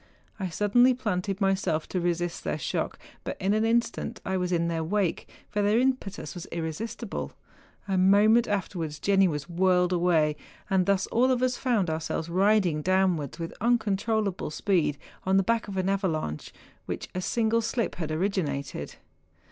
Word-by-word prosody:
I 190 Hz, -2 st, -2 dB
suddenly 245 Hz, +8 st, +4 dB
planted 195 Hz, -5 st, -2 dB
myself 190 Hz, -5 st, 0 dB
to 180 Hz, -, -1 dB
resist 175 Hz, 0 st, -1 dB
their -, -, -1 dB
shock, -, -, -2 dB, 0.3 s
but -, -, -4 dB
in 195 Hz, +1 st, +1 dB
an 215 Hz, +1 st, +2 dB
instant 230 Hz, 0 st, 0 dB
I 190 Hz, -, -1 dB
was 180 Hz, -1 st, -1 dB
in 170 Hz, -1 st, +1 dB
their 165 Hz, -1 st, -1 dB
wake, 190 Hz, +1 st, -1 dB, 0.2 s
for 210 Hz, -, -1 dB
their 205 Hz, +2 st, +3 dB
impetus 255 Hz, -6 st, -1 dB
was 175 Hz, -3 st, -8 dB
irresistible. 195 Hz, +7 st, -4 dB, 0.5 s
A 190 Hz, -1 st, +1 dB
moment 210 Hz, +5 st, +5 dB
afterwards 175 Hz, -6 st, -2 dB
Jenni 195 Hz, +3 st, +3 dB
was 150 Hz, -3 st, -3 dB
whirled 180 Hz, 0 st, +2 dB
away, 165 Hz, -4 st, +2 dB, 0.3 s
and 190 Hz, -1 st, +3 dB
thus 195 Hz, -1 st, +2 dB
all 250 Hz, +3 st, +3 dB
of 255 Hz, -1 st, +1 dB
us 255 Hz, -1 st, +2 dB
found 235 Hz, -9 st, +1 dB
ourselves 160 Hz, +1 st, -3 dB
riding 185 Hz, -3 st, +3 dB
downwards 185 Hz, -5 st, +1 dB
with 165 Hz, -1 st, -5 dB
uncontrollable 220 Hz, -4 st, 0 dB
speed 160 Hz, -3 st, 0 dB, 0.3 s
on 190 Hz, +1 st, +2 dB
the 195 Hz, -, +4 dB
back 230 Hz, +2 st, 0 dB
of 195 Hz, -1 st, -5 dB
an 185 Hz, 0 st, 0 dB
avalanche 165 Hz, -, -1 dB, 0.4 s
which -, -, -4 dB
a 185 Hz, -, -2 dB
single 230 Hz, +3 st, +1 dB
slip 230 Hz, +1 st, -1 dB
had 160 Hz, -3 st, -3 dB
originated. 155 Hz, -, -2 dB
190 Hz, 165 wpm, -27 LUFS, 170-215 Hz, 0.5 s, moment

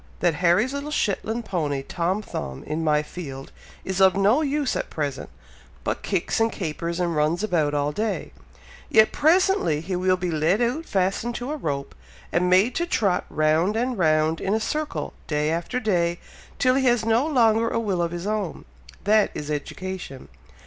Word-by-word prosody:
that 175 Hz, -2 st, +2 dB
Harry's 185 Hz, +9 st, +3 dB
little 280 Hz, +1 st, -4 dB
Shetland 225 Hz, -3 st, -1 dB
pony, 150 Hz, -8 st, -2 dB
Tom 185 Hz, +7 st, -1 dB
Thumb, 65 Hz, -, -6 dB
in 160 Hz, +2 st, -3 dB
my 150 Hz, -1 st, +2 dB
field, 140 Hz, -5 st, -8 dB, 0.3 s
is 190 Hz, 0 st, -1 dB
of 190 Hz, -1 st, +6 dB
no 205 Hz, +9 st, +3 dB
use 290 Hz, -2 st, 0 dB
at -, -, -3 dB
present, 145 Hz, -4 st, -4 dB, 0.5 s
but -, -, -2 dB
kicks, 190 Hz, +1 st, -1 dB
and 225 Hz, 0 st, +2 dB
capers, 170 Hz, 0 st, -4 dB
and 170 Hz, -2 st, 0 dB
runs 155 Hz, +5 st, +1 dB
about 155 Hz, -8 st, +1 dB
all 145 Hz, 0 st, 0 dB
day; 215 Hz, +7 st, -3 dB, 0.6 s
yet 220 Hz, 0 st, +5 dB
presently 340 Hz, -, +3 dB
he 180 Hz, +4 st, -4 dB
will 185 Hz, +1 st, +2 dB
be 180 Hz, -1 st, -2 dB
led 160 Hz, +6 st, +2 dB
out 250 Hz, +8 st, -1 dB
fastened 195 Hz, +5 st, 0 dB
to 245 Hz, +4 st, -4 dB
a -, -, -2 dB
rope, 145 Hz, -, -3 dB, 0.4 s
and 180 Hz, +1 st, +2 dB
made 190 Hz, +7 st, +4 dB
to 345 Hz, +6 st, -1 dB
trot 195 Hz, -, +1 dB
round 155 Hz, +6 st, +2 dB
and 250 Hz, +2 st, 0 dB
round 155 Hz, -1 st, +2 dB
in 195 Hz, +2 st, 0 dB
a -, -, +1 dB
circle, 300 Hz, +7 st, -3 dB
day 150 Hz, 0 st, 0 dB
after 170 Hz, +10 st, -2 dB
day, 175 Hz, -7 st, +1 dB, 0.4 s
till 255 Hz, -1 st, +3 dB
he 265 Hz, 0 st, +1 dB
has 240 Hz, -3 st, +2 dB
no 230 Hz, +6 st, +2 dB
longer 230 Hz, -5 st, +3 dB
a 230 Hz, -, -1 dB
will 200 Hz, -6 st, -1 dB
of 170 Hz, -, 0 dB
his 175 Hz, +1 st, -6 dB
own, 210 Hz, -4 st, -3 dB, 0.4 s
that 210 Hz, +1 st, +4 dB
is 150 Hz, 0 st, -4 dB
education. 175 Hz, -1 st, -6 dB
185 Hz, 180 wpm, -24 LUFS, 160-230 Hz, 0.6 s, of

